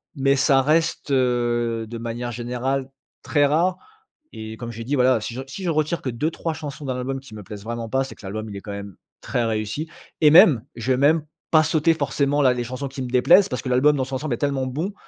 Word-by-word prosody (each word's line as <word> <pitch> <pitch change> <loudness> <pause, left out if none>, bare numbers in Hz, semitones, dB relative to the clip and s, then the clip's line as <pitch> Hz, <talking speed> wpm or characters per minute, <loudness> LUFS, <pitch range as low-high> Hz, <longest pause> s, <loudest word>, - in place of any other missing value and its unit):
mais 135 -1 +2
ça 135 0 +4
reste, 160 +3 +1
heu, 120 -3 +1
de 120 - -6
manière 120 +1 -4
générale, 125 +3 -2 0.3
très 145 -2 +2
rare. 170 +5 +1 0.6
Et 110 0 -7
comme 120 0 -7
j'ai 115 0 -7
dit 135 +5 -2
voilà, 130 -3 +3
si 115 - -5
je 130 - -5
re - - -7
si 190 +9 -8
je 180 - -2
retire 155 +2 0
que - - -3
2-3 160 +7 -2
chansons 150 -2 -7
dans 130 - -2
l'album 130 +2 -3
qui 130 -4 -14
me 105 - -8
plaisent 105 0 -9
vraiment 115 0 -4
pas, 135 +2 +2
c'est 135 - -9
que - - -17
l'album, 110 +3 -5
il 100 - -7
est - - -6
quand 100 - -8
même 100 -2 -8 0.2
très 120 - -1
réussi. 110 +7 -2 0.3
Et 150 - +7
même, 155 - +7
je 120 +2 -4
vais - - +2
même 150 +3 +3 0.3
pas 155 -1 +6
sauter, 155 +1 +2
forcément, 140 -1 0
la 130 -2 +5
les 120 -1 -3
chansons 130 +3 -5
qui 135 +1 -8
me 125 - -4
déplaisent 130 +10 +5
parce 125 - -2
que 130 - -5
l'album, 135 +4 +4
dans 130 - 0
son 130 +1 -7
ensemble, 145 +1 -3
est - - -5
tellement 140 -2 -1
bon 155 +10 -3
130 Hz, 245 wpm, -23 LUFS, 120-145 Hz, 0.6 s, Et